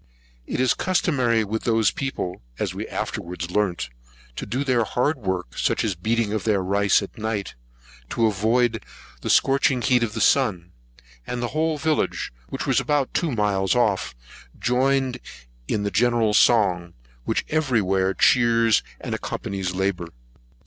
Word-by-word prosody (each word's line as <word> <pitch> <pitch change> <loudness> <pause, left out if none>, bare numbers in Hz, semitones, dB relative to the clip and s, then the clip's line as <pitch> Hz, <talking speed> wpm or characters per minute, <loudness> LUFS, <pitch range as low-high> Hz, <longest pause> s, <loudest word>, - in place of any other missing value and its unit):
It - - -3
is 130 0 +3
customary 130 -11 +1
with 110 +2 -3
those 115 -2 +2
people, 135 - -4 0.2
as - - -2
we - - -5
afterwards 85 0 -5
learnt, 90 -8 0 0.5
to - - -6
do 130 +4 -1
their 125 -4 +2
hard 130 +6 0
work, 95 - -3
such - - 0
as 105 - 0
beating 110 +4 -1
out 110 - -2
their 105 -4 +1
rice 100 +2 +2
at 100 - -10
night, 110 -2 -3 0.6
to 115 - +1
avoid 110 +2 +1 0.4
the - - -4
scorching 135 -1 +3
heat 125 -2 +3
of 115 -3 -1
the - - -2
sun; 95 -11 +2 0.6
and 125 - -3
the 120 0 -2
whole 155 +2 0
village, 155 - -1 0.2
which - - -4
was - - +2
about 145 -3 0
two 165 -4 0
miles 105 -3 +1
off, 105 - +1 0.4
joined 130 +1 +1 0.5
in 105 - -1
the 100 - -1
general 115 +1 +2
song, 95 -7 +3 0.3
which - - -1
every 145 -7 +1
where 95 -1 +1
chears 115 0 +4 0.2
and - - -4
accompanies 95 -2 -4
labour. 95 -2 -1
110 Hz, 155 wpm, -23 LUFS, 95-125 Hz, 0.6 s, chears